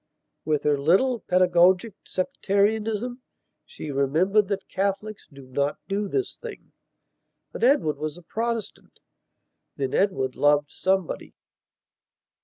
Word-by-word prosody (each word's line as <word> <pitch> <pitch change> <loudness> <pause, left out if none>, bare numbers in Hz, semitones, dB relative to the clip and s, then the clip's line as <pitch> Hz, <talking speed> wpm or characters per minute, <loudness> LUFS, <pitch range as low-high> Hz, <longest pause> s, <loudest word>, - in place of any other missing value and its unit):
With 150 -1 0
her 145 -1 +2
little, 195 - +3
pedagogic 180 +2 +3
sectarianism 220 +2 0 0.5
she 150 - -7
remembered 165 +10 +2
that 195 -1 -3
Catholics 200 +2 -3
do 140 -1 -13
not 140 +3 -1
do 200 +1 -1
this 390 - -2
thing. - - -10 0.8
But - - -6
Edward 240 - +3
was 155 +1 -4
a 175 - -14
Protestant. 230 +4 -4 0.8
Then 135 -2 -2
Edward 135 -10 +1
loved 145 0 +3
somebody.... 190 -2 -1
190 Hz, 110 wpm, -25 LUFS, 150-215 Hz, 0.8 s, little